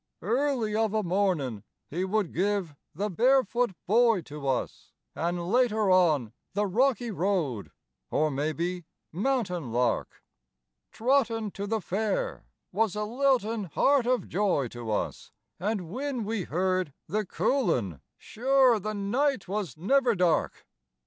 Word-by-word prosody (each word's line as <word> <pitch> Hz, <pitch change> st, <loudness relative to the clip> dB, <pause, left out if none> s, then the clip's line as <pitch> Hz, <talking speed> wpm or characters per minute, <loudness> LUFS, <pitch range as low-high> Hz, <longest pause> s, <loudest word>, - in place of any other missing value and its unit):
Early 235 Hz, 0 st, 0 dB
of 220 Hz, -1 st, +1 dB
a 215 Hz, -, +1 dB
mornin' 175 Hz, -, 0 dB, 0.3 s
would 190 Hz, +6 st, 0 dB
he -, -, -14 dB
give 190 Hz, -2 st, 0 dB, 0.2 s
"The 205 Hz, +5 st, -2 dB
Barefoot 245 Hz, +1 st, +2 dB
Boy" 225 Hz, -1 st, +4 dB
to 145 Hz, -2 st, -7 dB
us, 130 Hz, -, -3 dB, 0.2 s
An' 175 Hz, +2 st, -1 dB
later 215 Hz, +2 st, +2 dB
on 155 Hz, -11 st, +3 dB, 0.2 s
"The 205 Hz, +1 st, +2 dB
Rocky 240 Hz, +3 st, +1 dB
Road" 175 Hz, -, -1 dB, 0.4 s
or 155 Hz, 0 st, +1 dB
maybe 160 Hz, +5 st, -2 dB, 0.3 s
"Mountain 185 Hz, -, -1 dB
Lark," 120 Hz, 0 st, -1 dB, 0.7 s
"Trottin' 230 Hz, -4 st, +1 dB
to 200 Hz, +2 st, -5 dB
the 220 Hz, 0 st, -1 dB
Fair" 205 Hz, +3 st, -2 dB, 0.2 s
was 210 Hz, 0 st, +1 dB
a 210 Hz, -, -1 dB
liltin' 230 Hz, -3 st, +1 dB
heart 275 Hz, -4 st, +3 dB
of 255 Hz, -1 st, +1 dB
joy 185 Hz, -9 st, +1 dB
to 120 Hz, -1 st, -7 dB
us, 105 Hz, -, -3 dB, 0.3 s
An' 210 Hz, +5 st, 0 dB
whin 255 Hz, +1 st, -3 dB
we 215 Hz, -4 st, -2 dB
heard 185 Hz, -2 st, 0 dB
"The 215 Hz, +2 st, -1 dB
Coulin" 165 Hz, -, 0 dB, 0.2 s
sure 260 Hz, -1 st, +3 dB
the 215 Hz, +2 st, -4 dB
night 240 Hz, +5 st, 0 dB
was 195 Hz, -3 st, -3 dB
never 245 Hz, -, +2 dB
dark. 180 Hz, -3 st, +1 dB
205 Hz, 130 wpm, -28 LUFS, 175-235 Hz, 0.7 s, Boy